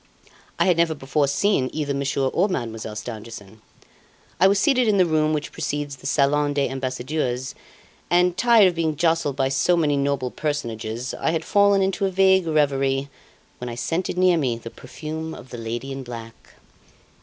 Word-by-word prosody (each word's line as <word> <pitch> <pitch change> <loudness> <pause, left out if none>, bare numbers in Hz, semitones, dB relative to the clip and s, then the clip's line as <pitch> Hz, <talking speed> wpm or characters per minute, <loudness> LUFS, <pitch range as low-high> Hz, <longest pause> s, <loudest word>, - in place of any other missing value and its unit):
I - - +2
had 180 -3 +3
never 170 -1 +2
before 140 +1 0
seen 140 -1 +1
either 145 -2 -2
Monsieur 140 0 -1
or 190 +9 +1
Mademoiselle 115 - -4
Stangerson. 110 -2 -8 0.8
I 190 - +6
was 200 +1 +3
seated 255 0 +3
in 210 -2 +3
the 185 - +5
room 155 -2 +1
which 150 -1 -2
precedes 145 -1 -4
the - - -7
Salon 145 0 +2
des 140 -3 +1
Ambassadeurs, 130 0 -3 0.6
and, 175 0 +3
tired 225 0 +5
of - - -4
being 160 -2 -1
jostled 165 -3 +1
by 135 -1 +1
so 140 +6 +2
many 150 -3 +2
noble 140 -2 -1
personages, 120 -5 -4
I - - -1
had 160 0 -1
fallen 200 -1 +4
into 195 +1 0
a - - -1
vague 190 -1 +3
reverie, 140 -3 +1 0.5
when 125 - -5
I 120 - -6
scented 165 +9 -2
near 180 -1 +4
me 125 -5 0
the 115 0 -9
perfume 155 +5 -7
of 130 - -13
the 120 - -7
lady 120 +4 -5
in 135 0 -5
black. 115 -2 -10
145 Hz, 180 wpm, -23 LUFS, 130-170 Hz, 0.8 s, I